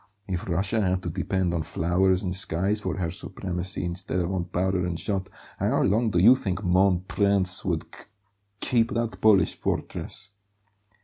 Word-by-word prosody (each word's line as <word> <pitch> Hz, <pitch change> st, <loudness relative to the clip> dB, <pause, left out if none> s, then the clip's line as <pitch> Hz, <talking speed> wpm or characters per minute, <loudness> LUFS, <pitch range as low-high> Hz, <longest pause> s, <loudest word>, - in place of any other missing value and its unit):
If 90 Hz, -1 st, -4 dB
Russia 95 Hz, +6 st, +1 dB
had 95 Hz, -2 st, 0 dB
to 85 Hz, -, -3 dB
depend 95 Hz, +1 st, -1 dB
on 85 Hz, -, 0 dB
flowers 90 Hz, +4 st, +1 dB
and 90 Hz, -1 st, -2 dB
skies 95 Hz, +3 st, +1 dB
for 95 Hz, -3 st, -3 dB
her 85 Hz, -3 st, -2 dB
supremacy 90 Hz, +1 st, -3 dB
instead 90 Hz, +1 st, -3 dB
of 90 Hz, +1 st, -1 dB
on 90 Hz, -2 st, -1 dB
powder 90 Hz, +1 st, -1 dB
and 85 Hz, -2 st, -3 dB
shot, 95 Hz, -2 st, -3 dB, 0.3 s
how -, -, +1 dB
long 110 Hz, +4 st, +2 dB
do 90 Hz, -, -1 dB
you 110 Hz, +9 st, +7 dB
think 95 Hz, -5 st, -3 dB
'mon 90 Hz, 0 st, +3 dB
prince' 100 Hz, -2 st, +1 dB
would 85 Hz, -5 st, -2 dB
k -, -, -13 dB, 0.6 s
keep 115 Hz, -2 st, +1 dB
that 115 Hz, -5 st, -2 dB
Polish 100 Hz, -6 st, +4 dB
fortress?" 100 Hz, -, -3 dB
95 Hz, 170 wpm, -26 LUFS, 90-100 Hz, 0.6 s, you